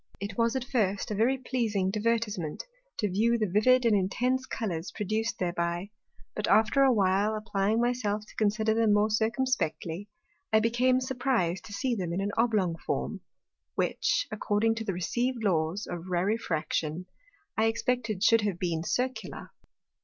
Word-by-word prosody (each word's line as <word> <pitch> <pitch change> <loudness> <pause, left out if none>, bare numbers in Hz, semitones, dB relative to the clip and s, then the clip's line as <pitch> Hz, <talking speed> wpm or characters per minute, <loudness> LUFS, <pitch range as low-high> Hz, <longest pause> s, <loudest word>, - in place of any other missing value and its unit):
It 200 0 -5
was 230 +2 +1
at 260 - -1
first 210 -6 -1
a - - 0
very 235 +6 +2
pleasing 225 -7 -1
Divertisement, 215 -6 -1 0.3
to 210 - 0
view 225 +5 +2
the 220 - +1
vivid 235 +6 +3
and 225 -2 +4
intense 250 +7 0
Colours 180 -7 -3
produced 215 +1 -2
thereby; 175 +2 -2 0.4
but 210 - -2
after 225 +5 +4
a 270 -1 +6
while 200 0 +2
applying 215 0 0
my 240 +1 +2
self 210 -3 -2
to - - -17
consider 215 +1 +1
them 225 -2 +3
more 210 +1 +2
circumspectly, 215 - -1 0.4
I 220 - +5
became 250 +3 +2
surpriz'd 250 -9 0
to 205 - -9
see 255 +4 -1
them 180 -6 -2
in 180 - -1
an 200 +1 -1
oblong 210 -8 +1
Form; - - -2 0.5
which, - - 0
according 215 +1 +1
to 225 - -3
the 200 -3 -2
received 240 +7 -1
Laws 175 0 0
of 175 0 -6
Rarefraction, 175 -3 -1 0.5
I 220 - +2
expected 225 -2 -1
should 230 +1 +5
have 205 -4 -1
been 170 -3 -1
Circular. 255 +8 -3
215 Hz, 160 wpm, -28 LUFS, 190-235 Hz, 0.5 s, a